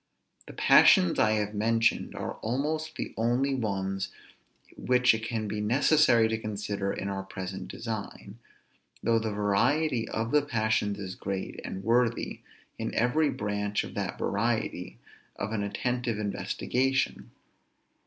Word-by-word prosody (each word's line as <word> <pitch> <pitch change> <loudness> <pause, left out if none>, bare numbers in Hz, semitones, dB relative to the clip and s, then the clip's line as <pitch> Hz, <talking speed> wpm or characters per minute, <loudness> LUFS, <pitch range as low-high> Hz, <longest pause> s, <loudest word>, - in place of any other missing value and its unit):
The - - -9
passions 90 - +6
I 110 0 +4
have 105 -1 -1
mentioned 115 +2 +1
are - - -4
almost 155 +7 -2
the - - -5
only 120 +5 +1
ones 95 -5 -2 0.7
which 125 -1 +3
it 110 0 -3
can 115 -2 -2
be 105 +1 -3
necessary 120 +1 +4
to 110 0 -2
consider 100 -2 -3
in 95 - -4
our 100 -1 -2
present 95 -1 -6
design; 110 -1 -6 0.6
though 115 -1 +3
the 110 0 -2
variety 110 +6 +1
of 115 +1 -2
the 150 - +5
passions 110 -6 0
is 95 -2 -5
great, 95 0 -5
and 95 - -6
worthy, 115 +1 +1 0.4
in - - -3
every 145 +6 +2
branch 105 0 -1
of - - -8
that - - -3
variety, - - -1 0.4
of 100 - -4
an 110 -2 -1
attentive 120 +3 -2
investigation. 125 +5 -1
110 Hz, 135 wpm, -28 LUFS, 100-125 Hz, 0.7 s, passions